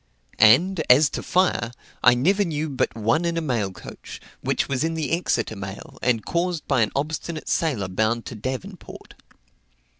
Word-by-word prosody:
And, 160 - +5
as 140 +3 +6
to - - -4
fire, 180 -10 +1 0.3
I 125 0 +7
never 190 +11 +2
knew 155 -3 -2
but 135 -4 -1
one 115 +9 +1
in 170 -1 -1
a - - 0
mail 120 -10 -1
coach, - - -10 0.2
which - - 0
was 135 +1 -1
in 165 0 -1
the 155 -4 -3
Exeter 120 -10 0
mail, 95 0 -8
and 120 -3 +1
caused 170 -1 -2
by 135 -4 +2
an 110 - +1
obstinate 155 +3 -3
sailor 130 - 0
bound 110 +5 0
to - - -7
Devonport. 130 - -7
140 Hz, 170 wpm, -23 LUFS, 115-165 Hz, 0.3 s, I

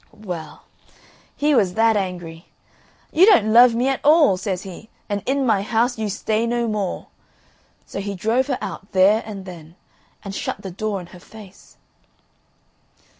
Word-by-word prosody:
Well, 175 -5 -7 0.7
he 295 +1 +1
was 195 -8 +2
that 225 0 +3
angry. 175 -4 -5 0.6
"You 355 +5 +5
don't 220 - +5
love 240 0 +7
me 245 +3 0
at 270 -1 0
all," 300 - +5
says 190 0 -4
he, 195 +3 -11 0.2
"and 205 -1 -2
in 270 +1 +1
my 215 -5 +2
house 230 +3 0
you 215 -1 -2
stay 215 +3 -1
no 235 0 -1
more." 210 -4 -3 0.8
So - - -7
he 200 0 -4
drove 225 +8 0
her 265 -3 -1
out 195 - -7
there 195 +4 +4
and 200 -3 -8
then, 170 -3 -11 0.5
and 195 - -6
shut - - -5
the 190 - -6
door 205 +2 -3
in - - -10
her 180 - -12
face. 205 0 -16
210 Hz, 165 wpm, -21 LUFS, 190-235 Hz, 0.8 s, love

